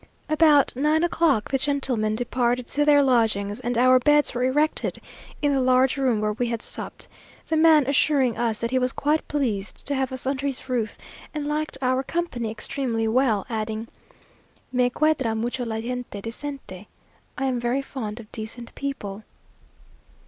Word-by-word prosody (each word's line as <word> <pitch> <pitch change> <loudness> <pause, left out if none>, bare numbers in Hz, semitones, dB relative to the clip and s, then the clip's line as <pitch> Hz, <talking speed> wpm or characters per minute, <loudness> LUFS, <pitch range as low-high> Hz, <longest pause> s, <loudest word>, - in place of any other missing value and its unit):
About 305 -4 +4
nine 305 +5 +2
o'clock 315 -10 +1
the 270 - +1
gentlemen 255 -7 0
departed 245 +1 0
to 295 +4 0
their 290 -1 +6
lodgings, 220 -5 +1
and 240 0 -2
our 255 +1 +6
beds 295 +3 +3
were 245 - -2
erected 295 +4 0 0.4
in 290 -1 +3
the 270 - +2
large 255 +1 +3
room 260 -6 +1
where 210 0 0
we 240 +3 -1
had 230 -1 -3
supped; - - -7 0.4
the 320 - +1
man 315 -2 +6
assuring 275 -3 +2
us 230 -2 0
that 230 +2 -3
he 260 - +2
was 250 0 0
quite 300 +2 0
pleased 230 -9 -2
to 285 - +1
have 265 -1 -1
us 260 0 -5
under 275 +1 -1
his 270 -2 -4
roof, 235 -5 -2 0.4
and 300 -1 -2
liked 300 -1 -2
our 255 +1 +2
company 270 -6 -3
extremely 225 0 -2
well; 225 -3 +2
adding, 220 0 -3 0.8
"Me 250 -1 +2
cuadra 270 -5 +1
mucho 245 +3 -2
la 220 -1 -3
gente 245 -2 -5
decente" 225 -3 -7 0.5
(I 270 - -1
am 255 -2 0
very 240 +3 0
fond 230 -5 -6
of 215 -2 -12
decent 230 +2 -7
people). 215 -7 -5
255 Hz, 170 wpm, -24 LUFS, 225-280 Hz, 0.8 s, their